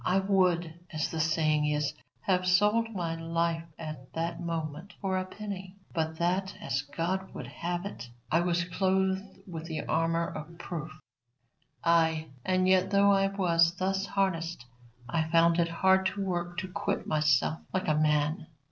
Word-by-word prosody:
I 185 - +2
would, 180 -4 +2 0.2
as 155 -1 -1
the 160 - -3
saying 155 -1 +2
is, 150 -1 0 0.3
have 185 -1 +1
sold 210 +5 +3
my 175 -5 -2
life 165 0 -1
at 155 -5 -7
that 170 +1 -2
moment 165 +1 -4
for 190 -1 -1
a 185 0 0
penny; 195 -1 -7 0.2
but 160 -1 -1
that, 185 +3 0
as 135 - -1
God 170 +7 -3
would - - -5
have 175 +2 -3
it, 160 -11 -7 0.2
I 165 - +4
was 175 0 +1
clothed 190 +2 0
with 165 -2 -7 0.2
armour 165 +1 +1
of 165 +1 -7
proof: 165 -2 -5 0.9
ay, 160 -2 +3
and 185 0 +2
yet 185 0 +4
though 200 0 +5
I 195 0 +4
was 170 -4 +3
thus 190 +1 -1
harnessed, 170 -8 -1 0.4
I 160 +5 0
found 170 +1 +4
it 170 0 +2
hard 190 +3 +3
work 175 -3 -2
to 185 - -2
quit 200 +2 -2
myself 150 0 +2
like 185 - -1
a 155 - +4
man. 150 +1 +1
170 Hz, 155 wpm, -29 LUFS, 160-190 Hz, 0.9 s, though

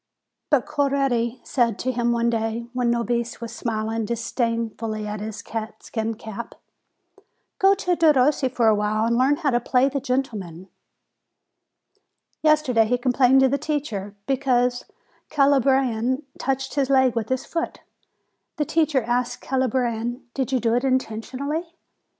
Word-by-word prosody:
But 285 -5 +3
Coretti 275 -5 0
said 235 -5 +1
to 255 - -1
him 240 -1 0
one 235 0 +1
day, 225 0 -2
when 250 -1 +1
Nobis 235 0 -1
was 235 0 -7
smiling 225 -1 -2
disdainfully 230 -1 -2
at 210 0 -4
his 215 +1 -6
catskin 225 0 -4
cap: 220 +1 -8 1.0
"Go 390 +1 +5
to 360 -2 0
Derossi 290 -4 +3
for 240 -2 +1
a 220 - +6
while, 210 +1 0
and 235 +1 +1
learn 260 +4 +3
how 290 -2 0
to 240 - +2
play 255 +2 +2
the 275 0 -2
gentleman!" 210 -10 -3 1.7
Yesterday 300 -7 +3
he 245 +2 +1
complained 255 +1 +4
to 265 - +6
the 280 +2 0
teacher, 225 -10 -3
because 250 -2 +1
the - - -33 0.4
Calabrian 265 -2 +2 0.2
touched 270 0 -2
his 275 -2 0
leg 260 -3 +4
with 225 -2 -2
his 260 0 -1
foot. 335 0 -4 0.7
The 300 - -1
teacher 310 -4 +1
asked 240 +1 -1
the - - -16
Calabrian: 250 -2 -1
"Did 265 -1 -2
you 260 - +2
do 230 -1 +1
it 245 +2 +1
intentionally?" 270 +6 -2
245 Hz, 145 wpm, -23 LUFS, 230-270 Hz, 1.7 s, a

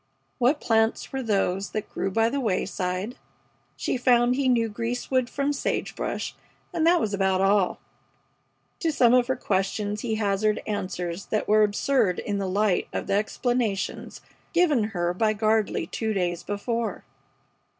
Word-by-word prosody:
What 260 +5 +3
plants 225 +2 +1
were 265 - -1
those 195 -4 0
that 215 - -3
grew 195 - -2
by 225 +4 +2
the 280 +3 -2
wayside? 190 0 -2 0.6
She - - -1
found 245 -1 +4
he 265 -1 +1
knew 230 -2 +3
greasewood 240 +3 -1
from 280 +1 -1
sage 280 - -2
brush, - - -3 0.4
and 330 -2 +2
that 350 +1 +5
was 210 -8 -1
about 190 -1 +2
all. 195 -1 +2 1.0
To 330 - +1
some 245 -5 +4
of 250 -1 +4
her 260 - +1
questions 205 +2 -1
he 225 -3 -1
hazarded 210 0 0
answers 185 -3 -4
that 215 - -1
were 215 +1 +5
absurd 210 -1 +2
in 205 -1 -2
the 195 -1 -2
light 200 -1 +1
of - - -3
the - - -1
explanations 215 0 -1 0.3
given 310 -10 +3
her 175 -5 -1
by 215 +4 +1
Gardley 215 -4 +1
two 220 +5 -2
days 175 -2 -1
before. 230 +3 -3
215 Hz, 155 wpm, -25 LUFS, 195-245 Hz, 1.0 s, that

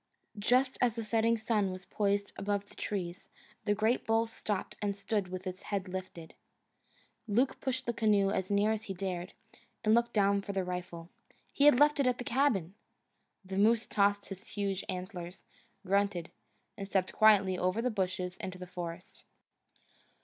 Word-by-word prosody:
Just 255 +5 +2
as 240 -3 +3
the 230 - -3
setting 225 +1 +2
sun 215 -3 0
was 185 +1 -8
poised 200 -1 0
above 200 0 -2
the - - -17
trees, 180 -3 -4 0.4
the 205 - +2
great 220 +4 +1
bull 225 +1 +3
stopped 215 -3 -4
and 200 -1 0
stood 205 -1 -1
with 185 +1 -6
head 185 +1 -4
lifted. 180 -3 -7 0.9
Luke 240 +6 +1
pushed 260 -1 -2
the 235 - -1
canoe 210 -4 +3
as 190 -2 -1
near 205 +1 +3
as 220 -1 -1
he 195 -3 -6
dared, 180 -1 -4 0.5
and 215 0 +4
looked 235 +1 +3
down 200 -2 +3
for 200 0 -5
the 190 -1 0
rifle. 180 -1 -6 0.4
He 280 - +3
had 295 -4 +7
left 295 0 +5
it 275 - +3
at 250 -1 +2
the - - -5
cabin! 230 - +1 0.7
The 190 +1 -3
moose 225 +2 +4
tossed 200 0 +1
his 195 +1 -8
huge 200 -2 -2
antlers, 180 -1 -6 0.4
grunted, 200 -3 +1 0.4
and 195 - -6
stepped 190 -1 0
quietly 200 -3 +5
over 185 +4 +1
the 250 +2 0
bushes 185 -3 -2
into 185 -1 -6
the 180 - -7
forest. 175 0 -7
200 Hz, 170 wpm, -32 LUFS, 185-220 Hz, 0.9 s, had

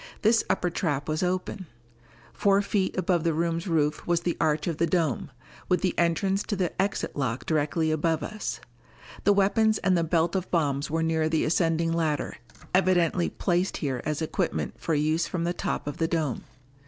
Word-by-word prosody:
This 225 +2 +4
upper 180 - +1
trap 150 -5 -1
was 155 +1 -1
open. 185 +1 -2 0.7
Four 200 0 +3
feet 195 -2 -1
above 180 -3 +1
the 165 -2 +1
room's 165 +2 -1
roof 155 -3 0
was 170 -1 +2
the 175 0 -1
arch 150 0 +1
of 170 -4 -2
the 170 - +2
dome, 160 -6 0 0.4
with 180 - +2
the 185 -3 +1
entrance 190 +4 +1
to 210 - -3
the 185 -3 -1
exit 195 +1 -2
lock 125 -3 -2
directly 155 +1 +1
above 160 0 0
us. 215 +5 -4 0.7
The 205 - +6
weapons 215 +2 +3
and 190 -1 +2
the 170 - +2
belt 165 +2 +1
of 185 -1 -2
bombs 145 -4 0
were 160 +1 0
near 160 -1 +1
the 160 0 +1
ascending 165 0 +1
ladder, 160 -3 -1 0.4
evidently 180 -2 +3
placed 180 +1 0
here 130 -4 -2
as 155 +1 -2
equipment 170 +2 -2
for 165 - -1
use 155 +3 +1
from 170 -2 -2
the 175 +1 0
top - - -3
of 145 - -4
the 165 - +1
dome. 160 -6 -2
165 Hz, 185 wpm, -27 LUFS, 155-185 Hz, 0.7 s, The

